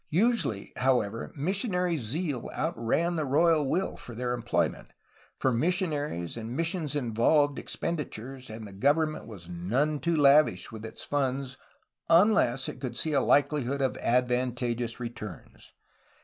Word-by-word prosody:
Usually, 175 - +1
however, 120 -4 0
missionary 180 - 0
zeal 135 +3 -3
outran 165 +3 0
the 155 - 0
royal 150 +1 +3
will 185 +6 0
for 120 - -9
their 125 +1 -1
employment, 120 - -1 0.4
for 130 - +1
missionaries 150 - -1
and 115 +2 -5
mis 165 0 +1
sions 155 -5 -3
involved 140 +3 +2
expenditures, 135 -6 -4
and 110 0 -7
the 100 - -11
government 150 +8 +1
was 95 -7 -10
none 120 - 0
too 170 +2 0
lavish 140 -9 +4
with 110 -1 -8
its 110 +1 -8
funds 135 -2 -1 0.5
unless 165 - +4
it - - -6
could 130 -3 -5
see 155 - -1
a. 140 - +4
likelihood 140 -1 +2
of 130 - 0
advantageous 125 -1 0
returns. 115 -6 -8
135 Hz, 135 wpm, -28 LUFS, 120-155 Hz, 0.5 s, lavish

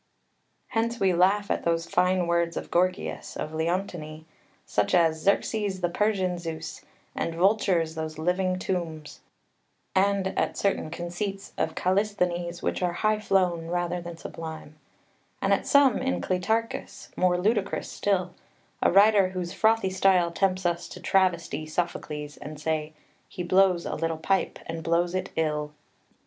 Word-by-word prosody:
] - - -27
2 225 - +2
Hence 230 +1 -1
we 190 -2 +3
laugh 195 +4 +3
at - - -1
those 165 0 +1
fine 180 +1 +2
words 170 0 0
of - - -6
Gorgias 185 +2 -1
of 155 - -4
Leontini, 160 -2 -3 0.4
such 105 - +1
as 160 -2 +3
"Xerxes 200 0 0
the 175 - +1
Persian 190 -2 0
Zeus" 165 -1 -6 0.3
and 165 - -3
"vultures, 180 -3 +2
those 160 -1 -5
living 185 +3 0
tombs," 165 -5 -4 0.7
and 195 0 +2
at - - -1
certain 195 -5 0
conceits 195 +4 -5
of 160 0 -1
Callisthenes 180 -3 0
which - - -1
are 175 -1 +1
high 215 +4 +1
flown 180 -5 +1
rather 175 0 -1
than 170 -1 -8
sublime, 160 -2 -8 0.7
and - - +2
at - - 0
some 280 -5 +5
in 90 0 -1
Cleitarchus 220 - -2
more 180 -1 +2
ludicrous 200 +1 0
still 185 -3 -1 0.5
a - - +4
writer 200 0 +6
whose 180 -2 -4
frothy 220 -3 +2
style 185 -2 +3
tempts 185 +1 0
us 175 0 0
to - - -10
travesty 170 -5 +1
Sophocles 155 -3 -3
and 150 0 -8
say, 155 0 -2 0.4
"He 180 - -5
blows 185 -1 +3
a - - -3
little 165 0 -1
pipe, 190 +4 0
and 165 0 -5
blows 170 +2 +1
it 185 +1 -2
ill." 150 -2 -1
180 Hz, 150 wpm, -27 LUFS, 165-195 Hz, 0.7 s, writer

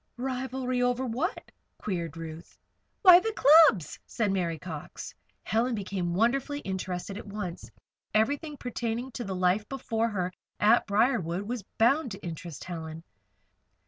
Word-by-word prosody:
"Rivalry 255 0 -2
over 245 +1 +1
what?" 260 - -3 0.3
queried 170 -5 -4
Ruth. 165 0 -9 0.5
"Why, 360 -2 +10
the 445 +3 -2
clubs," 280 - +6
said 215 -4 0
Mary 175 -4 -1
Cox. 160 -2 -8 0.3
Helen 230 +4 +1
became 185 -4 -2
wonderfully 270 +7 +1
interested 190 +1 -4
at - - -10
once. 200 -4 -6 0.4
Everything 285 +8 0
pertaining 240 0 -3
to 240 - -5
the 195 -3 -4
life 185 +3 +1
before 230 -4 -1
her 185 -4 -2 0.3
at 225 +3 +4
Briarwood 200 -4 +1
was 235 +2 -4 0.2
bound 260 +5 +3
to 195 - -10
interest 165 -3 -7
Helen. 165 -2 -7
215 Hz, 135 wpm, -28 LUFS, 180-250 Hz, 0.5 s, Why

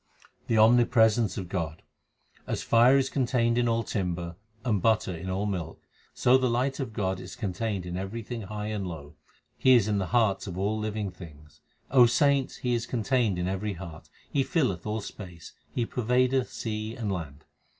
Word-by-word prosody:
The 115 - +2
omnipresence 110 -2 +4
of 95 - -4
God: 85 -3 -4 0.6
As - - -2
fire 120 +4 +5
is 135 -1 +2
contained 120 -3 +1
in 120 - +2
all 115 0 +1
timber, 90 -5 -3 0.3
and 105 -6 +1
butter 110 -4 +2
in 90 +3 -6
all 95 +2 -1
milk, 95 -6 -4 0.3
So 130 +2 +4
the 130 -1 +1
light 130 +4 0
of 130 -5 -3
God 95 -3 -2
is 95 +1 -9
contained 100 -3 -3
in 90 0 -5
everything 115 +5 -5
high 105 +1 -5
and 105 -3 -3
low; 75 -4 -8 0.5
He 130 -1 +6
is 110 -4 +4
in 105 -2 +1
the 95 - -2
hearts 110 -4 +1
of 90 -2 -6
all 105 +3 0
living 105 -2 -3
things. 75 -4 -14 0.3
O 125 -2 +7
saints, 140 +2 +2
He 125 -1 -1
is 115 -1 -1
contained 120 -4 +1
in 90 0 -1
every 100 +2 -2
heart. 85 -3 -10 0.2
He 135 - +1
nlleth 125 - 0
all 110 +1 -2
space; 90 -5 -10 0.2
He 120 - -1
pervadeth 125 +2 +1
sea 110 0 -4
and 110 -4 -3
land. 80 -5 -6
105 Hz, 180 wpm, -28 LUFS, 95-120 Hz, 0.6 s, O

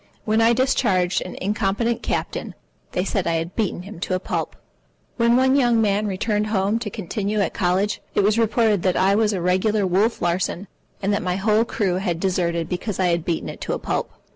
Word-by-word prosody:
When 220 +1 +2
I 230 +1 +5
discharged 210 -8 +1
an 180 - -7
incompetent 210 +3 0
captain, - - -3 0.4
they 180 - 0
said 195 -3 -1
I 165 - +1
had 165 +2 -3
beaten 205 -5 -1
him 195 -2 -10
to 185 0 -1
a - - -1
pulp. - - -3 0.6
When 235 0 +4
one 260 +1 +4
young 240 -4 +3
man 210 -1 +1
returned 210 +2 -1
home 210 +1 +1
to 230 - -4
continue 210 +1 -3
at 200 - 0
college, 190 +3 0
it 205 - +3
was 210 +3 +3
reported 220 -3 +2
that 185 0 +1
I 190 +1 +3
was 215 +1 +2
a 190 -4 -2
regular 190 +4 +1
Wolf 200 +6 +1
Larsen, 175 +2 -1 0.4
and 200 +1 +1
that 200 - 0
my 180 0 -1
whole 215 +3 +2
crew 195 -5 -1
had 180 -3 -2
deserted 170 -3 0
because 180 +3 -4
I 185 -1 +3
had 170 -1 0
beaten 165 -1 -2
it - - -8
to - - -2
a - - -1
pulp. - - -3
200 Hz, 210 wpm, -22 LUFS, 180-220 Hz, 0.6 s, I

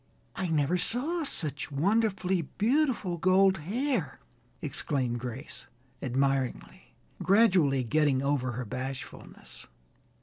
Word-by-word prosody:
"I 190 - -2
never 160 +2 +1
saw 315 - -1
such 150 - -4
wonderfully 190 +3 +1
beautiful 225 - 0
gold 190 +1 +4
hair," 205 - -2 0.4
exclaimed 130 -4 -2
Grace, 125 +4 -7 0.3
admiringly, 135 0 -2 0.3
gradually 180 - +4
getting 140 +1 +2
over 135 -3 0
her 125 +1 -4
bashfulness. 130 +3 -7
155 Hz, 95 wpm, -29 LUFS, 135-195 Hz, 0.4 s, gold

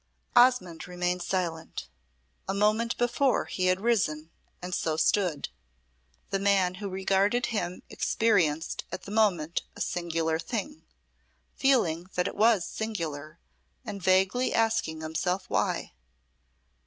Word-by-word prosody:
Osmonde 240 -11 +4
remained 180 0 -1
silent. 175 -3 -3 0.6
A 195 - 0
moment 215 +3 +2
before 245 +2 +2
he 185 -1 -1
had 185 +1 +2
risen, 170 -9 0 0.3
and 180 0 -6
so 160 -2 0
stood. 175 -5 +1 0.8
The 195 - +1
man 195 -2 +3
who 200 - -3
regarded 195 +5 +1
him 185 -4 -3
experienced 170 -9 +1
at - - -5
the 200 - -9
moment 180 -7 +2
a - - -11
singular 165 -2 -1
thing, 185 -2 -4 0.7
feeling 185 -11 +2
that 180 - +1
it - - -4
was 220 -4 +4
singular, 165 -8 -5 0.5
and 205 -3 -6
vaguely 190 +7 +2
asking 225 -8 +1
himself 180 +4 -2
why. - - 0
185 Hz, 120 wpm, -28 LUFS, 165-215 Hz, 0.8 s, Osmonde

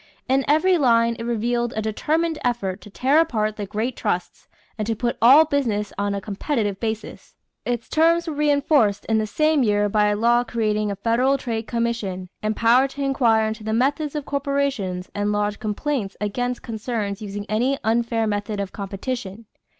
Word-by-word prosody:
In 270 +1 +2
every 345 +5 +3
line 230 -3 +3
it 230 - -4
revealed 240 +1 -1
a 220 - -1
determined 315 +9 -1
effort 205 -6 -1
to - - -12
tear 265 +9 +2
apart 215 -10 0
the 205 -2 -5
great 220 +5 -2
trusts 175 0 -3 0.3
and 215 -2 -3
to 225 - 0
put 240 +2 -1
all 275 +7 +8
business 230 -9 -1
on 200 0 -1
a - - -2
competitive 205 0 -2
basis. 220 -1 -5 0.3
Its 240 -2 -2
terms 335 +2 +3
were 320 - -3
reinforced 285 -7 +2
in 220 -1 +1
the 215 - -1
same 305 +6 +2
year 205 -3 +2
by 210 0 +3
a 210 - +1
law 235 +3 +3
creating 215 -3 -1
a 200 - -2
Federal 240 +7 +2
Trade 230 -4 -4
Commission 230 -6 -2
empowered 230 +5 +3
to 280 +1 -5
inquire 240 -5 +3
into 220 0 -5
the 220 0 -2
methods 285 +5 0
of 295 -2 -3
corporations 275 -10 -1
and 205 0 -1
lodge 205 0 -1
complaints 215 -1 -3
against 245 +4 -2
concerns 220 -3 -4
"using 205 -1 -5
any 245 +6 +1
unfair 230 0 +1
method 205 0 -2
of 195 -2 -3
competition." 200 +1 -5
230 Hz, 175 wpm, -22 LUFS, 210-270 Hz, 0.3 s, all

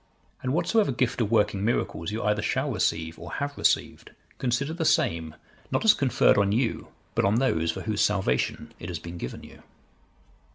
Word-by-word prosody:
And 130 - -2
whatsoever 175 +4 +2
gift 125 -1 0
of 105 - 0
working 105 -3 +2
miracles 105 -5 -1
you 110 +1 -3
either 105 0 +1
shall - - -1
receive, 80 0 -1
or 85 0 -8
have 145 0 -3
received, - - 0 0.3
consider 135 +4 0
the 165 0 -2
same, 80 - +1 0.3
not - - 0
as 215 - +8
conferred 130 -6 +3
on 100 -1 +2
you, 115 +2 0 0.3
but - - +1
on 100 +2 +3
those 85 -10 +1
for - - -2
whose - - -1
salvation 60 0 0
it 85 - -7
has 85 - -3
been 85 +1 -8
given - - -6
you." - - -14
105 Hz, 180 wpm, -26 LUFS, 85-130 Hz, 0.3 s, as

